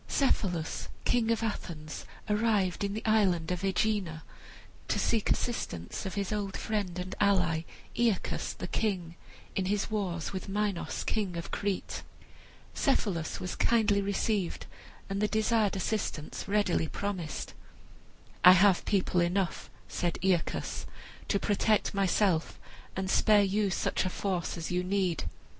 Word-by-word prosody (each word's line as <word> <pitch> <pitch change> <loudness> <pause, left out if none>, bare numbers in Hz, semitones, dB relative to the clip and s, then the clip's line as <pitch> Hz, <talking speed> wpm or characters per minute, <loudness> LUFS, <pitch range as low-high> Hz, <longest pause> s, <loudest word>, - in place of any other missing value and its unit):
Cephalus, 180 - 0 0.2
king 235 -2 +2
of 230 0 +1
Athens, 160 -8 -4 0.2
arrived 210 -4 +1
in 200 0 -1
the 220 - -5
island 190 -7 +3
of 180 +1 -2
Aegina 190 -4 0 0.6
to - - 0
seek 225 -3 +1
assistance 90 - -2
of 190 - -5
his 200 0 -1
old 200 -2 -2
friend 200 -5 -2
and 180 +1 -4
ally 180 -5 +3 0.3
Aeacus, 230 -5 0
the - - -6
king, 185 -6 -1 0.4
in 190 - 0
his 205 +3 0
war 190 -5 -1
with 190 +1 -5
Minos, 205 -2 -1
king 195 -5 -1
of 170 - -6
Crete. 200 -2 -2 0.7
Cephalus 200 - 0
was 180 - -4
most - - -7
kindly 220 -3 +3
received, 200 -1 -1 0.4
and 195 0 -2
the 210 - +3
desired 220 -1 +2
assistance 190 -6 -2
readily 200 -5 +2
promised. 185 -4 -4 0.9
"I 180 - +11
have 190 0 +5
people 185 -3 +2
enough," 175 +1 0 0.2
said 175 -2 -1
Aeacus, 185 -4 0 0.4
"to 200 - +2
protect 210 +2 +2
myself 195 -3 +1 0.4
and 190 0 -2
spare 205 +2 +5
you 200 +1 +1
such - - 0
a 185 - 0
force 180 -2 -2
as 165 0 -4
you 180 0 +1
need." 185 -3 0
195 Hz, 140 wpm, -30 LUFS, 180-210 Hz, 0.9 s, I